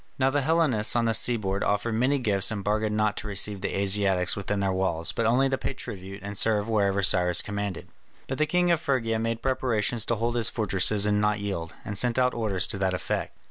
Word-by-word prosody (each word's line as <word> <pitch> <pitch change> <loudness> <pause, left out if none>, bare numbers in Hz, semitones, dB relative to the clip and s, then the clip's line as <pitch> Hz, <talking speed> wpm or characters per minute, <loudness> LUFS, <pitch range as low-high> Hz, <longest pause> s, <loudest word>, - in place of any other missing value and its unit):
Now 135 0 +2
the 145 +1 +1
Hellenes 140 -9 +2
on 120 -1 +2
the 115 - +1
seaboard 105 -4 +1
offered 105 +3 0
many 130 +6 +1
gifts 105 -7 +2
and 105 -2 -3
bargained 105 +1 0
not 105 -1 +1
to - - -6
receive 100 -1 -2
the 100 - -3
Asiatics 95 -2 +1
within 100 0 -3
their 100 -1 0
walls, 95 -3 +1
but 115 - -1
only 130 +4 +3
to 135 0 -2
pay - - -3
tribute 100 -5 -8
and 100 +1 -6
serve 105 +1 +1
wherever 100 -3 +1
Cyrus 90 -2 +3
commanded. 100 -3 -5 0.4
But 135 - -5
the 155 - +2
king 180 +1 +2
of 170 -1 +1
Phrygia 115 -7 0
made 115 0 -3
preparations 120 -4 0
to 115 - 0
hold 120 +2 -1
his 115 -2 +2
fortresses 105 -1 +2
and 105 0 +1
not 105 0 +1
yield, 90 -5 -5
and 105 - -5
sent 120 +4 0
out 125 0 +2
orders 105 -5 -1
to 100 - -2
that 95 -1 0
effect. - - -4
105 Hz, 220 wpm, -26 LUFS, 100-120 Hz, 0.4 s, only